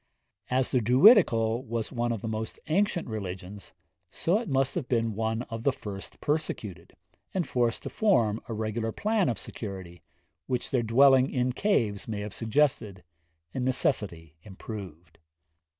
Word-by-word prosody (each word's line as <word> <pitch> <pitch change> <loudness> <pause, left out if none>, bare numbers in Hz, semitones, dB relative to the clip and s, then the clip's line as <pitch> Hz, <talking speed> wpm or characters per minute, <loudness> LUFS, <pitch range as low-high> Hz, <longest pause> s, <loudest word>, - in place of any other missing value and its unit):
As 130 0 +1
the 125 - +2
Druidical 125 - +5
was 115 -3 -3
one 120 -2 -1
of 115 -4 -4
the - - -3
most 110 0 -4
ancient 180 +2 +1
religions, 100 -2 -6 0.4
so 180 +6 +1
it 235 - -6
must 135 0 +1
have 160 -8 -3
been 115 -2 0
one 110 +2 -1
of 115 -2 -6
the 140 - +2
first 100 -6 -9
persecuted, 110 - -3 0.4
and 180 -3 0
forced 120 -2 0
to - - -4
form 115 - +2
a - - -2
regular 110 +1 -2
plan 210 - +1
of 115 - -1
security, 95 -7 -7 0.5
which 125 -2 -2
their 130 -3 +2
dwelling 130 +3 +5
in 125 -1 0
caves 120 - 0
may 105 -2 -3
have 105 -1 -6
suggested, 115 -5 0 0.5
and 130 - -2
necessity 100 - -1
improved.' 90 -5 -9
115 Hz, 150 wpm, -28 LUFS, 105-130 Hz, 0.5 s, Druidical